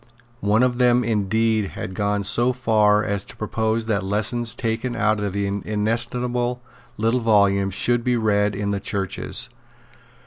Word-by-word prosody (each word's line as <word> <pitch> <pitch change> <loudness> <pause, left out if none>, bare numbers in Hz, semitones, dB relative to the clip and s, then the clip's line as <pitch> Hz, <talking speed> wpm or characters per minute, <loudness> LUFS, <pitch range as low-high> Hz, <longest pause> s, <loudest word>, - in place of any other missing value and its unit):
One 105 +2 +2
of 125 -1 +1
them 125 0 +4
indeed 110 -1 0
had 95 - -5
gone 100 +1 -1
so 120 +5 +2
far 105 -4 +3
as 100 -2 -2
to - - -8
propose 110 +1 -1
that 105 -4 0
lessons 115 +4 -1
taken 120 +1 -2
out 110 -1 +1
of 100 -1 -2
the 100 0 -1
inestimable 120 +4 -1 0.4
little 115 +3 +1
volume 100 -4 +3
should 120 +5 0
be 125 0 +1
read 105 -2 +1
in 100 0 -2
the 100 - -1
churches. 100 +5 -3
110 Hz, 150 wpm, -22 LUFS, 100-120 Hz, 0.4 s, them